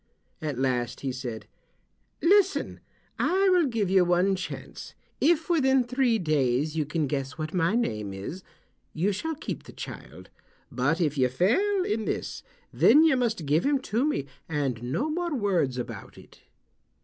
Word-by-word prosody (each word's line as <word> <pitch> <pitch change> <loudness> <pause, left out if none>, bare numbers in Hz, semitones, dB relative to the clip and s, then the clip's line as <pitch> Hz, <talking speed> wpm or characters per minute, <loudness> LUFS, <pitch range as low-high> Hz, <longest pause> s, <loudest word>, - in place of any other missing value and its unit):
At 150 -5 -3
last 125 -2 -1
he 135 - -2
said, 125 -3 -6 0.8
"Listen, 395 +2 +3 0.4
I 385 +2 +3
will 355 -4 +4
give 225 -5 -1
you 190 0 +4
one 180 +2 +2
chance. 185 - -7 0.2
If 320 +1 +3
within 265 -6 +3
three 245 -1 +1
days 150 - 0
you 155 -3 -1
can 155 0 -1
guess 135 +1 -3
what 155 -1 -4
my 180 +3 +1
name 105 - -1
is 100 - -6 0.5
you 180 +6 +1
shall 320 +11 -3
keep 295 - -5
the - - -11
child, - - -10 0.4
but 145 +7 0
if 150 -4 0
you 130 -1 +3
fail 365 - +2
in 220 - -1
this - - -3 0.3
then 305 - +6
you 320 -4 +5
must 225 -9 -1
give 150 +4 +2
him 285 0 +2 0.2
to 235 +4 +3
me, 290 - 0 0.2
and 140 -7 -1
no 140 - -1
more 340 0 -2
words 180 - 0
about 125 - -7
it." - - -16
180 Hz, 160 wpm, -27 LUFS, -, 0.8 s, then